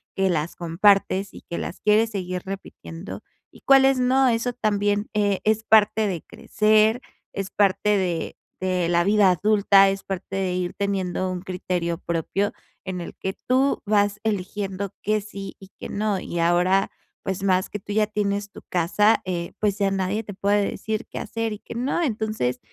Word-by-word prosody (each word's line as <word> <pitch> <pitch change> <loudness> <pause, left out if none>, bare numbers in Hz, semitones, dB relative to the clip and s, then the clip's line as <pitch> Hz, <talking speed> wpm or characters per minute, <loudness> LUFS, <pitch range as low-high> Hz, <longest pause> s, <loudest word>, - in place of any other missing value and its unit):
que 195 0 +2
las 160 -1 -1
compartes 195 +3 +2
y - - -11
que 170 - -6
las - - -6
quieres 215 +2 +3
seguir 185 -3 -3
repitiendo 190 -2 -8 0.3
y - - -18
cuáles 270 -1 +5
no. 260 +1 +3
Eso 235 +1 0
también, 205 -2 0
eh, 205 -2 +1
es 220 0 +1
parte 215 0 +4
de 180 -5 -3
crecer, 215 +2 +2 0.3
es 195 0 -4
parte 205 0 +2
de 175 -4 -2 0.2
de 185 -2 0
la 170 0 +3
vida 205 0 +4
adulta, 200 +1 +4
es 195 0 -3
parte 195 0 -5
de 190 -2 -1
ir 180 -1 -2
teniendo 185 -2 -2
un 180 -1 -4
criterio 180 -2 -2
propio 170 +4 -1 0.3
en 185 -2 -4
el 170 - -7
que 190 0 -4
tú 265 +2 +2
vas 205 -1 +2
eligiendo 200 -1 -3
que 215 0 +1
sí 200 -1 -8
y 195 - -14
que - - -7
no. 205 -1 -1
Y 175 - -5
ahora, 180 +3 +3 0.3
pues, 190 0 -4
más 185 -1 +2
que - - -4
tú 205 +1 -7
ya 215 0 +2
tienes 205 -1 -2
tu - - -12
casa, 195 +5 +3
eh, 175 -2 -3
pues, 205 -2 +1
ya 200 -1 +1
nadie 195 +3 -1
te 205 - -8
puede 200 +1 +1
decir 220 -1 -4
qué - - -6
hacer 225 -1 -3
y 210 - -8
qué - - -10
no. 255 +8 -1
Entonces 215 - -1
200 Hz, 180 wpm, -24 LUFS, 185-215 Hz, 0.3 s, cuáles